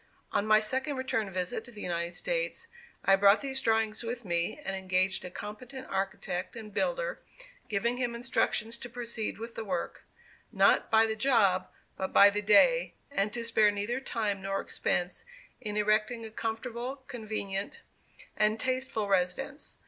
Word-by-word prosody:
On 205 - 0
my 215 0 +7
second 265 +7 0
return 260 -6 -1
visit 185 +3 -2
to 240 - -13
the 210 -3 -8
United 170 0 -2
States, - - -1 0.4
I 195 - +7
brought 200 +1 +5
these 265 -1 -1
drawings 220 -1 +1
with 235 0 -4
me 170 - -1
and 195 - -2
engaged 185 0 0
a 180 - -5
competent 250 +8 -8
architect 195 -1 -2
and 215 -3 -8
builder, - - -1 0.5
giving 235 +4 0
him 245 -2 -1
instructions 235 -2 0
to 240 - -7
proceed 235 -2 -4
with 230 +1 -7
the 225 - -5
work, 185 -5 -3 0.5
not - - +4
"by 225 0 +6
the 220 -1 -1
job" 215 -6 +3 0.3
but 190 - -3
"by 200 0 +8
the 205 +1 -1
day," 215 - +5 0.2
and 210 -6 0
to 235 - -3
spare 220 -2 +4
neither 205 +5 -2
time 215 -7 -2
nor 195 0 -1
expense 180 0 -1 0.4
in 210 -3 -3
erecting 215 +2 +1
a 220 - -8
comfortable, 235 +4 -4
convenient, 210 -4 -4 0.5
and 215 +1 +2
tasteful 255 -4 -1
residence. 195 - -1
220 Hz, 160 wpm, -30 LUFS, 195-245 Hz, 0.5 s, by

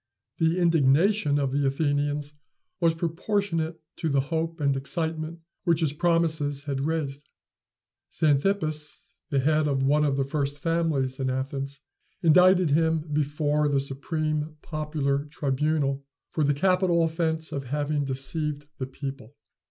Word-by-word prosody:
The 165 +2 +2
indignation 165 0 +3
of 140 -2 0
the 140 +1 +1
Athenians 145 +1 0 0.5
was 165 -2 +3
proportionate 165 -1 -1 0.2
to 160 - -1
the 140 -1 +2
hope 165 +1 -1
and 140 -2 +2
excitement 160 +4 -3 0.2
which 170 -1 +2
his 150 -3 +1
promises 160 -4 +1
had 140 -2 -3
raised. 150 -2 -3 0.8
Xanthippas, 155 0 0 0.2
the 140 -2 +1
head 155 +2 +2
of 135 -2 +1
one 145 +3 +3
of 140 -2 +1
the 135 - +2
first 140 +1 -2
families 155 -5 0
in 130 -1 0
Athens, 135 +2 -3 0.4
indicted 180 0 +5
him 160 0 +1
before 150 0 +1
the 140 -1 +2
supreme 155 +2 -2
popular 150 -3 -1
tribunal 145 -1 -1 0.3
for 155 - 0
the 145 0 +2
capital 180 +1 +3
offence 160 -1 -1
of 140 -3 -4
having 145 +2 -1
deceived 145 +2 -2
the 130 - -3
people. 135 -2 -7
150 Hz, 135 wpm, -26 LUFS, 140-160 Hz, 0.8 s, indicted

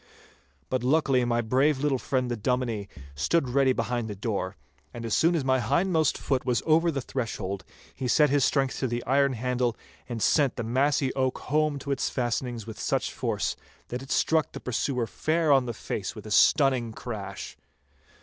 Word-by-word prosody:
But 130 -2 0
luckily 135 -2 +3
my 120 0 +1
brave 130 +6 +2
little 135 -1 0
friend 130 -2 -1
the - - 0
Dominie 115 -3 -1 0.2
stood 130 - +1
ready 135 +1 +3
behind 120 -2 -1
the 105 - -5
door, 100 -2 -3 0.4
and 115 - -6
as 115 - 0
soon 170 +2 +3
as 150 -5 -1
my 130 0 +3
hindmost 165 +2 +1
foot 135 -2 -1
was 125 -2 0
over 165 +2 +4
the 140 -4 -2
threshold, 110 -7 -4 0.3
he 130 - -4
set 150 +3 +4
his 145 -1 +3
strength 135 -2 +1
to 130 - 0
the 120 0 -3
iron 140 +1 +3
handle 125 0 -1 0.3
and 120 -2 -3
sent 140 +4 +3
the - - -3
massy 135 +3 +1
oak 130 -1 0
home 150 +1 0
to 140 +1 -5
its 135 - 0
fastenings 120 -2 -2
with 110 - -9
such - - -1
force - - -1 0.3
that 125 +1 -4
it 135 - -11
struck 160 +1 +1
the - - -6
pursuer 125 0 -1
fair 160 +6 0
on 135 -3 +4
the - - -1
face 115 - -5
with - - -10
a 110 - -8
stunning 130 +1 +4
crash. 100 -5 -6
130 Hz, 190 wpm, -27 LUFS, 120-140 Hz, 0.4 s, over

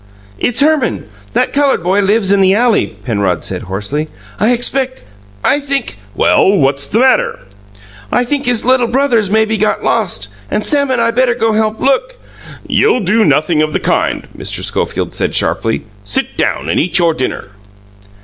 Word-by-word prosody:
"It's 245 +3 0
Herman 295 -5 +1 0.3
that - - 0
coloured 280 -7 +1
boy 190 +3 +1
lives 200 0 +2
in 200 -1 +3
the 190 +1 +4
alley," 235 -1 +2 0.2
Penrod 100 -7 -1
said - - -3
hoarsely. 105 - -3 0.3
"I 215 +5 +3
expect 260 +2 0 0.4
I 290 - +2
think 280 - -3
" 100 - -27
"Well, 195 +1 +3
what's 140 -2 +1
the - - -1
matter?" 260 +2 +2 0.7
"I 245 - +2
think 280 +2 -2
his 245 -3 +2
little 255 -1 +3
brother's 240 -5 +1
maybe 220 +1 +1
got 215 +1 0
lost, 175 - -1 0.2
and 210 - -2
Sam 285 -2 +2
and 255 -2 0
I 230 0 +2
better 245 0 +1
go 225 -2 0
help 215 0 0
look - - 0 0.3
" - - -15
"You'll 435 - +2
do 210 +4 +2
nothing 155 0 +2
of 155 0 -1
the - - 0
kind," - - -1
Mr. - - -2
Schofield - - -2
said - - -2
sharply. 115 0 0 0.2
"Sit 100 - -2
down 70 - -1
and 85 - 0
eat 180 - +1
your 170 -2 +3
dinner." 130 -8 -4
220 Hz, 180 wpm, -14 LUFS, 165-255 Hz, 0.7 s, the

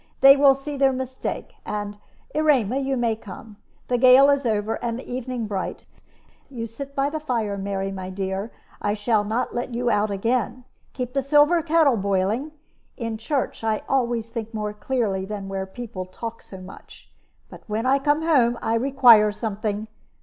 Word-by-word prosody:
They 275 0 +9
will 275 -1 +6
see 280 +1 -6
their 270 0 +4
mistake; 260 0 -5
and, 205 0 -5 0.3
Erema, 275 -6 +2
you 270 -1 -1
may 235 -2 +1
come. 210 0 -11 0.3
The 245 -1 +1
gale 260 +3 +7
is 280 -3 +1
over, 215 +1 -1
and 235 -1 -2
the 255 - -9
evening 250 -1 -4
bright. 200 -3 -4 0.6
You 235 -4 -5
sit 275 +5 -9
by 275 +1 +1
the 315 - -3
fire, 230 -9 -2
Mary, 195 0 -3
my 190 -1 -6
dear; 190 +3 -4 0.3
I 205 0 0
shall 215 0 +1
not 220 +4 -2
let 240 0 -3
you 240 0 0
out 210 +1 +1
again; 235 +4 -1 0.3
keep 250 -1 -4
the 275 - +1
silver 295 +5 +4
kettle 315 -5 +3
boiling. 200 +8 0 0.5
In 230 -3 -4
church 270 0 -2
I 220 -1 0
always 235 -4 0
think 225 -1 -6
more 210 -1 -3
clearly 210 -4 -1
than 200 0 -6
where 195 0 -4
people 190 -3 -7
talk 230 +5 -7
so 190 - -11
much. 185 +1 -13 0.4
But - - -11
when 220 +2 -2
I 270 +2 +3
come 290 +3 +1
home 250 -8 +3
I 225 - -1
require 235 -4 +6
something. 210 0 -3
230 Hz, 175 wpm, -23 LUFS, 210-265 Hz, 0.6 s, They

